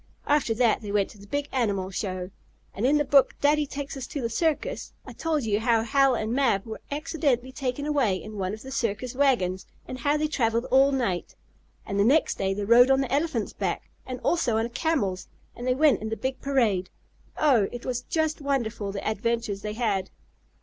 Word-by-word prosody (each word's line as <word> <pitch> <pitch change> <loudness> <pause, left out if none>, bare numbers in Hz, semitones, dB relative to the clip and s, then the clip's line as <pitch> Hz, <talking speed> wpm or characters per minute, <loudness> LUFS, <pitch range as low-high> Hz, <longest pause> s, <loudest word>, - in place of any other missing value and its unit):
After 285 -6 +2
that 235 -1 +2
they 205 -2 -6
went 200 -1 +1
to 210 - -16
the 200 - -14
big 285 +5 -2
animal 200 -7 -1
show. 185 -1 -4 0.4
And 220 +6 0
in 295 +2 +4
the 295 - +1
book 275 0 +4
"Daddy 295 0 +3
Takes 280 0 -6
Us 270 -1 -6
to 290 - -5
the 230 -3 -2
Circus," 330 - -1
I - - -9
told 315 -4 -1
you 210 -2 +1
how 230 -1 +2
Hal 270 +2 +3
and 220 0 -2
Mab 245 -7 +2
were 220 -1 -7
accidentally 285 -4 -1
taken 265 +1 -3
away 275 -10 +2
in 215 +2 -7
one 185 -1 -1
of 215 +1 -7
the 265 - -8
circus 230 0 -2
wagons, 240 -10 +1 0.2
and 255 - -6
how 290 +1 +2
they 305 0 0
traveled 230 -5 0
all 270 +1 +5
night. 235 -10 -2 0.5
And 200 - -2
the - - +5
next 280 +8 +3
day 195 0 0
they 205 0 -3
rode 240 +4 +7
on 270 0 +4
the 265 -1 -2
elephant's 280 -7 0
back, - - -3
and 255 -1 -6
also 250 -10 +1
on 225 - +1
a - - -5
camel's 235 - -1 0.3
and 245 - -6
they 255 - +2
went 295 -3 +4
in 220 - -3
the 225 - -3
big 260 0 -3
parade. 230 -10 +1 0.5
Oh! 250 -10 +4
it 240 - -7
was 250 -1 -2
just 315 +3 -1
wonderful 235 -7 -1
the 200 - -5
adventures 220 -2 -1
they 210 0 -4
had! 205 -5 -1
245 Hz, 210 wpm, -26 LUFS, 210-280 Hz, 0.5 s, rode